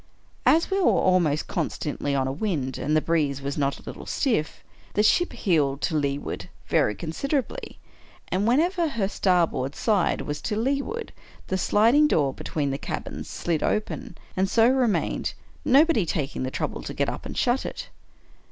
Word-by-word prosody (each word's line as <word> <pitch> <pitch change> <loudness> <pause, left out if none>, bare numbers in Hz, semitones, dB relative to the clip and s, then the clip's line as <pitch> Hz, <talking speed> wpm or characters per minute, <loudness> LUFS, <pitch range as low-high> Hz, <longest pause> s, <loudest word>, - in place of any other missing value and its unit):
As 330 +4 +4
we 390 - +2
were 370 - +3
almost 175 -5 +3
constantly 145 -1 -2
on 135 -1 +1
a - - -1
wind, 140 - -2
and 150 +3 +1
the - - +3
breeze 150 -5 0
was 140 0 -4
not 140 -1 0
a - - -15
little - - -8
stiff, 225 - -1 0.3
the 210 - +3
ship 350 +11 +3
heeled 145 -8 +1
to 165 - 0
leeward 140 -1 -2 0.2
very 105 - +2
considerably; 265 - -3 0.5
and 195 +4 0
whenever 335 +7 +2
her 230 -9 -1
starboard 170 -9 +1
side 205 -6 +1
was 145 0 -4
to 210 - -2
leeward, 280 - -2 0.4
the 190 - 0
sliding 235 +11 +4
door 145 - +2
between 145 -1 -2
the 135 - -3
cabins - - -5
slid 165 -3 -1
open, 230 +3 -2 0.2
and 190 0 +1
so 225 +2 +5
remained, 250 -4 +1 0.3
no 280 +3 +6
body 255 - +1
taking 145 -4 -2
the 130 - -1
trouble - - -3
to - - -7
get - - +1
up - - -4
and - - -7
shut 250 +2 +2
it. - - -6
185 Hz, 170 wpm, -25 LUFS, -, 0.5 s, no